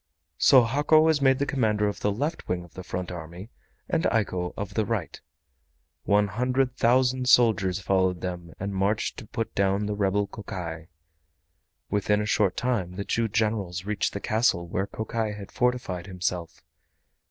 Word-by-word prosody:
So 130 -3 +7
Hako 145 +6 +4
was 160 -2 +3
made 135 +1 +3
commander 105 -6 +1
of 105 - -3
the 105 - +1
left 145 - -3
wing 90 -1 -1
of 85 - -16
the 95 - -7
front 90 0 -4
army, 85 +5 -8 0.4
and - - 0
Eiko 90 -5 0
of 100 -1 -5
the 110 - +1
right. 105 -6 -3 0.8
One 105 0 +3
hundred 125 +5 0
thousand 125 +1 +2
soldiers 100 -7 +4
followed 95 -2 +1
them 90 -2 -5
and 100 +1 -3
marched 100 +4 0
to 110 - -9
put 115 0 -4
down 100 +1 +1
the 105 - -2
rebel 100 0 +1
Kokai. 85 -6 -7 1.0
Within 105 +1 +2
a 105 - -1
short 105 -3 +1
time 105 -8 -1
the 100 +1 -4
two 115 0 0
Generals 105 -5 -1
reached 105 -1 -1
the 100 - -3
castle 110 -6 +1
where 95 +3 -2
Kokai 110 0 -3
had 100 -2 -9
fortified 120 -8 -1
himself. 90 -2 -4
105 Hz, 165 wpm, -26 LUFS, 95-115 Hz, 1.0 s, So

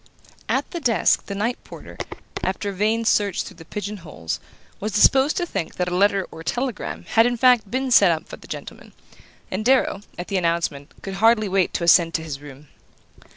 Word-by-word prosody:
At - - 0
the 345 - -4
desk 240 -8 +2
the 200 - -4
night 225 +5 -2
porter, - - -11 0.5
after 190 +2 -2
a - - -4
vain 220 +4 0
search 205 -4 +2
through 185 - -11
the 165 - -12
pigeon 210 +3 -5
holes, 85 - -6 0.4
was 210 0 -3
disposed 265 - +4
to 350 - 0
think 195 - -4
that 180 - -1
a 180 - -2
letter 195 0 +2
or 160 - -10
telegram 165 - -3
had 225 +1 +5
in 245 0 -1
fact 245 -4 +4
been 260 +3 -2
sent 200 -6 +7
up 160 -1 -3
for - - -9
the - - -15
gentleman; - - -9 0.6
and 190 +3 -2
Darrow, 255 -5 +2 0.2
at 175 - -5
the 195 - -1
announcement, 165 -5 -1
could 195 - -5
hardly 225 -1 +5
wait 190 -1 +1
to - - -1
ascend 170 -1 +5
to 160 - -1
his 145 -3 -6
room. 145 0 -13
195 Hz, 200 wpm, -23 LUFS, 170-230 Hz, 0.6 s, sent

